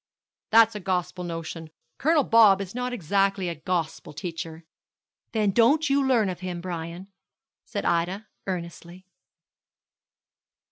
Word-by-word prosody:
'That's 225 0 +6
a 210 - -5
gospel 180 -1 -2
notion. 165 -1 -6 0.3
Colonel 310 0 +3
Bob 220 -5 +6
is 195 -1 -6
not 250 +1 -2
exactly 195 -2 0
a - - -2
gospel 165 -3 -3
teacher,' 165 -1 -6 0.7
'Then 210 -3 +1
don't 280 +8 +3
you 280 0 +3
learn 245 -6 +3
of 180 -2 -4
him, 180 -1 -5
Brian,' 170 +1 -6 0.6
said 215 -5 -4
Ida, 180 +5 0 0.2
earnestly. 175 0 -6
185 Hz, 125 wpm, -26 LUFS, 170-225 Hz, 0.7 s, That's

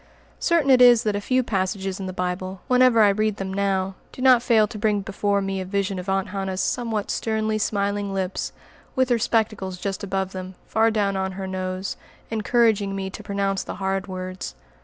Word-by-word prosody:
Certain 330 -6 +3
it 255 -1 +6
is 245 -2 +7
that 210 -2 0
a 205 - -2
few 255 +4 +1
passages 190 -2 -2
in 190 - -4
the - - -3
Bible, 185 +1 -3
whenever 250 -3 +5
I 210 - +7
read 215 +1 +1
them 190 0 -4
now, 195 -1 0 0.2
do - - -13
not 255 -2 +7
fail 230 -3 +4
to 220 -2 -8
bring 210 -1 +1
before 200 +1 0
me 195 0 -2
a - - -2
vision 195 0 -1
of 180 +2 -6
Aunt 195 -1 0
Hannah's 190 -1 -3
somewhat 220 +1 -1
sternly 220 -1 -1
smiling 200 -1 -1
lips, 190 -1 -2 0.4
with 260 0 +2
her 240 -1 +3
spectacles 215 -5 0
just 195 +1 -4
above 190 -1 -2
them, 185 0 -7
far 225 +1 +3
down 205 -3 0
on 190 0 -2
her 190 0 -5
nose, 185 0 -3 0.3
encouraging 220 -3 +2
me 190 -1 -4
to - - -8
pronounce 200 -1 -1
the - - -6
hard 195 +1 -2
words. 185 0 -6
200 Hz, 200 wpm, -24 LUFS, 190-220 Hz, 0.4 s, is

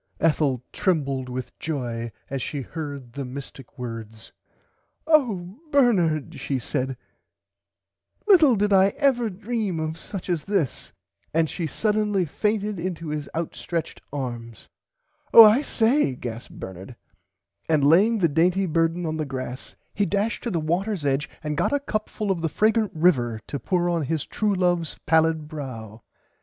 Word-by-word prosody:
[Pg - - -12
93] 165 - +7
Ethel 135 -5 -1
trembled 140 -8 0
with 125 0 -6
joy 120 -7 -3 0.2
as 135 -1 -4
she 145 +2 -3
heard 140 -5 -7
the 140 - -4
mistick 135 0 -9
words. 115 -3 -7 0.7
Oh 230 - +1
Bernard 190 - +2
she 135 - -2
said 130 0 -2 1.3
little 325 - +7
did 205 0 +1
I 195 +1 +5
ever 250 -5 +2
dream 210 -2 -3
of 160 +1 -3
such 195 -4 -7
as 175 -4 -1
this 195 - -1 0.4
and 165 0 +3
she 165 +1 -3
suddenly 210 +2 +1
fainted 210 +4 -1
into 170 -2 -4
his 150 -1 -4
out 165 0 -2
stretched 170 -2 -4
arms. 120 -5 -6 0.7
Oh 230 - +14
I 215 +6 +6
say 235 - +2
gasped 120 -1 -7
Bernard 95 +5 -8 0.7
and 155 -3 +3
laying 200 +10 +5
the 180 -5 +3
dainty 175 +5 +2
burden 165 +1 +1
on 155 0 -2
the 155 - -1
grass 130 -1 -6 0.2
he 205 -1 +1
dashed 205 +3 -1
to - - 0
the 175 -6 0
waters 175 +2 -1
edge 140 +2 0
and 150 -1 -2
got - - +1
a 285 - +2
cup 215 -6 -3
full 210 -2 -2
of 175 -3 -1
the 165 - 0
fragrant 220 +3 +2
river 125 -9 +2
to 140 - -5
pour 175 +6 0
on 170 -1 +1
his 160 0 -2
true 210 -2 0
loves 175 -3 0
pallid 160 -1 +2
brow. 120 -8 -7
165 Hz, 160 wpm, -24 LUFS, 135-200 Hz, 1.3 s, Oh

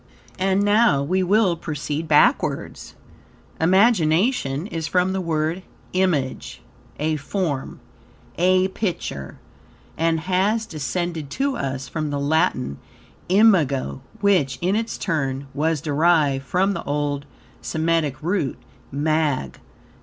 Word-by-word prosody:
And 190 +1 +2
now 205 -8 +4
we 185 +6 +1
will 190 -1 +3
proceed 155 -1 -4
BACKWARDS. 150 -1 +1 0.6
Imagination 180 - +3
is 165 -6 -4
from 180 +2 +1
the 190 - -1
word 160 +1 -1 0.3
"image," 175 -8 -1 0.3
a 155 +1 0
form, 145 -2 -3 0.6
a 185 +2 +3
picture, 175 - -4 0.6
and 165 -1 +1
has 190 +6 +1
descended 160 - -3
to 275 - -1
us 135 -1 -3
from 155 +2 -3
the 145 0 -2
Latin 140 - 0 0.5
"imago," 175 -11 +3 0.2
which, 175 -11 +2
in 185 +3 +1
its 225 +1 -2
turn, 140 -6 -2
was 155 +1 0
derived 150 -3 +2
from 190 +2 +1
the - - -5
old 145 -1 -2 0.4
Semitic 160 -4 -1
root, 175 -5 -1 0.3
"mag." 150 - 0
160 Hz, 110 wpm, -22 LUFS, 145-185 Hz, 0.6 s, now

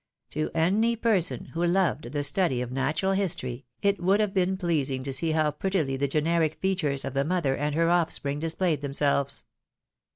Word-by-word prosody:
To 155 0 -2
any 205 +8 +2
person 220 -6 0
who 165 +1 -1
loved 175 -8 +1
the 145 0 -1
study 145 -2 +1
of 125 - -7
natural 145 +8 0
history, 140 -11 -2 0.2
it 200 -2 +2
would 190 +4 +3
have 210 -2 0
been 190 0 +1
pleasing 145 -8 0
to 135 0 -3
see 160 +5 +1
how 155 -1 +2
prettily 155 -3 -1
the 140 +1 0
generic 155 +2 +1
fea 190 0 +1
tures 145 -7 -1
of 135 - -4
the 140 0 +1
mother 155 -4 0
and 145 0 -2
her 165 +1 +2
offspring 155 -4 0
displayed 165 -1 0
themselves. 140 0 0
160 Hz, 185 wpm, -27 LUFS, 140-185 Hz, 0.2 s, would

